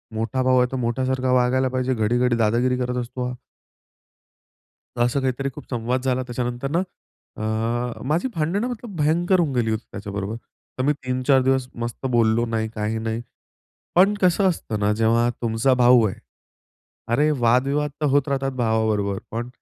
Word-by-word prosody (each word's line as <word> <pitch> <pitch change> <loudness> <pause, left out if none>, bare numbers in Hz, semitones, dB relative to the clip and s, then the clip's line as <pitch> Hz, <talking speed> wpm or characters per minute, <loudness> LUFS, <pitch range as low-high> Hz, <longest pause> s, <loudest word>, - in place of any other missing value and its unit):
मोठा 115 +4 -1
भाऊ 130 0 +3
आहे; 125 - +3
तो 130 - -2
मोठ्यासारखा 130 +2 0
वागायला 130 +1 +3
पाहिजे, 130 0 0
घडी-घडी 120 +2 +1
दादागिरी 120 +3 +2
करत 125 0 -2
असतो 125 +1 -4
हा." 125 - -5 1.7
असं 125 +3 +1
काहीतरी 135 +1 -1
खूप - - -9
संवाद 125 +1 -1
झाला 130 -1 +1
त्याच्यानंतर 125 +1 -3
ना 170 - +2 0.6
अ, 115 +2 -2
माझी 165 - +1
भांडणं 180 +9 0
मतलब 235 -5 -7
भयंकर 170 +5 +2
होऊन 160 -5 +1
गेली 115 -2 +1
होती 110 +2 -2
त्याच्याबरोबर, 100 +1 -5 0.4
तर 130 - -1
मी 150 +2 +3
3-4 130 0 +1
दिवस 130 -1 +1
मस्त 120 +3 -5
बोललो 115 0 +3
नाही, 110 -1 -1
काही 105 +1 -2
नाही. 115 +1 -3 0.7
पण 195 +3 +6
कसं 185 +2 +3
असतं 110 -10 -3
ना 105 0 +2
जेव्हा 115 +2 +2
तुमचा 115 +3 +2
भाऊ 125 -2 +5
आहे 95 - -5 1.0
अरे 150 +5 +3
वादविवाद 135 +5 +2
तर 150 - +1
होत 145 +1 +2
राहतात 135 -1 -1
भावाबरोबर 110 -4 0
पण 120 +2 -4
125 Hz, 160 wpm, -23 LUFS, 115-135 Hz, 1.7 s, पण